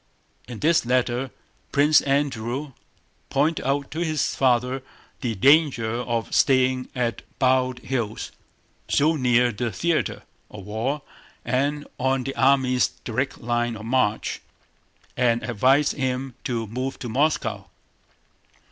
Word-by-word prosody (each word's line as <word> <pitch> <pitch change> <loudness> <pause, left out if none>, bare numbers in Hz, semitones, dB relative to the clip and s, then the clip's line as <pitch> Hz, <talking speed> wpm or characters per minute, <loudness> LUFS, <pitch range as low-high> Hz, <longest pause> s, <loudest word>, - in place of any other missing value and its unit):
In 120 -3 -8
this 160 +2 +3
letter 125 +1 0 0.4
Prince 145 +2 +5
Andrew 135 -1 -1 0.6
pointed 150 +4 +1
out 140 0 -1
to 160 - -4
his 155 -3 0
father 125 0 +1 0.4
the 120 -4 -2
danger 135 -1 +4
of 120 -2 -3
staying 130 -2 +3
at 120 -2 -1 0.2
Bald 130 -1 +2
Hills, 120 -5 -3 0.6
so 155 +3 +3
near 125 -3 +3
the 115 +2 -3
theater 170 - -1 0.3
of 100 -3 -10
war 120 +8 -2 0.4
and 145 +3 0
on 130 0 +1
the 135 +2 -4
army's 130 -2 +3 0.2
direct 130 +3 -2
line 120 0 -1
of 110 - -9
march, 115 -3 0 0.7
and 120 -1 +2
advised 130 +5 +3
him 130 -1 -2
to 115 -3 -1
move 130 +5 -4
to 125 - -6
Moscow. 115 -6 0
130 Hz, 120 wpm, -24 LUFS, 120-140 Hz, 0.7 s, Prince